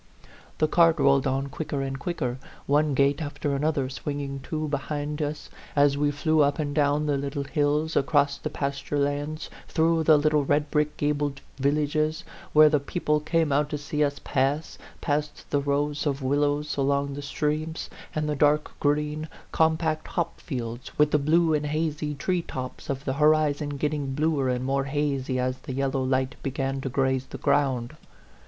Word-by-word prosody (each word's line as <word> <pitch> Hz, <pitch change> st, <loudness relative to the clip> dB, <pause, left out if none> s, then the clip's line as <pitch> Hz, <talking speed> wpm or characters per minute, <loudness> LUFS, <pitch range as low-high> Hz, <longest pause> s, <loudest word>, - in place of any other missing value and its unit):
The 155 Hz, -, +3 dB
cart 165 Hz, +1 st, +4 dB
rolled 140 Hz, -1 st, +4 dB
on 135 Hz, +1 st, -1 dB
quicker 140 Hz, -1 st, -3 dB
and 135 Hz, 0 st, -4 dB
quicker, 130 Hz, -6 st, -3 dB, 0.3 s
one 145 Hz, 0 st, +2 dB
gate 140 Hz, +2 st, +2 dB
after 145 Hz, -1 st, -2 dB
another 145 Hz, -1 st, 0 dB
swinging 140 Hz, 0 st, -4 dB
to 155 Hz, -1 st, -2 dB
behind 145 Hz, +1 st, -3 dB
us, 150 Hz, 0 st, -4 dB, 0.2 s
as 145 Hz, -1 st, +4 dB
we 145 Hz, +1 st, +1 dB
flew 155 Hz, +2 st, +2 dB
up 140 Hz, 0 st, +3 dB
and 145 Hz, -2 st, -2 dB
down 145 Hz, 0 st, +2 dB
the 145 Hz, -2 st, +1 dB
little 140 Hz, 0 st, -3 dB
hills, 150 Hz, +2 st, 0 dB
across 140 Hz, 0 st, +2 dB
the 155 Hz, -, -4 dB
pasture 140 Hz, 0 st, -3 dB
lands, 145 Hz, +2 st, -2 dB, 0.2 s
through 165 Hz, 0 st, +2 dB
the 155 Hz, -1 st, +7 dB
little 150 Hz, 0 st, +2 dB
red 145 Hz, +1 st, +1 dB
brick 150 Hz, -1 st, +1 dB
gabled 145 Hz, -1 st, -1 dB, 0.2 s
villages, 150 Hz, +2 st, 0 dB, 0.3 s
where 155 Hz, 0 st, +8 dB
the 150 Hz, -1 st, +3 dB
people 150 Hz, +1 st, 0 dB
came 160 Hz, 0 st, +1 dB
out 145 Hz, +1 st, +2 dB
to 150 Hz, -, -2 dB
see 145 Hz, +1 st, -1 dB
us 145 Hz, -1 st, -1 dB
pass, 140 Hz, +3 st, -1 dB, 0.2 s
past 150 Hz, 0 st, -2 dB
the 145 Hz, -, +2 dB
rows 145 Hz, +1 st, 0 dB
of 140 Hz, -1 st, -1 dB
wil 140 Hz, +2 st, +1 dB
lows 145 Hz, +1 st, 0 dB
along 140 Hz, 0 st, +1 dB
the 145 Hz, -, -5 dB
streams, 155 Hz, +3 st, -2 dB, 0.3 s
and 155 Hz, 0 st, 0 dB
the 150 Hz, -, 0 dB
dark 150 Hz, +1 st, +2 dB
green, 150 Hz, +1 st, 0 dB, 0.2 s
compact 160 Hz, -1 st, +1 dB
hop 170 Hz, -1 st, -3 dB
fields, 120 Hz, -4 st, -5 dB
with 150 Hz, 0 st, +4 dB
the 150 Hz, -, +4 dB
blue 160 Hz, +3 st, +3 dB
and 150 Hz, -1 st, 0 dB
hazy 150 Hz, -1 st, -1 dB
tree 180 Hz, +5 st, 0 dB
tops 130 Hz, -5 st, -7 dB
of 140 Hz, +1 st, -3 dB
the 130 Hz, -, 0 dB
horizon 150 Hz, -1 st, +3 dB
getting 145 Hz, -2 st, -1 dB
bluer 150 Hz, -3 st, +1 dB
and 125 Hz, 0 st, -1 dB
more 135 Hz, 0 st, 0 dB
hazy 135 Hz, -2 st, -1 dB
as 130 Hz, 0 st, -1 dB
the 130 Hz, -, -7 dB
yellow 135 Hz, 0 st, 0 dB
light 130 Hz, 0 st, 0 dB
began 135 Hz, 0 st, -2 dB
to 135 Hz, -, -3 dB
graze 130 Hz, 0 st, 0 dB
the -, -, -7 dB
ground. 130 Hz, -5 st, +1 dB
145 Hz, 175 wpm, -26 LUFS, 140-150 Hz, 0.3 s, where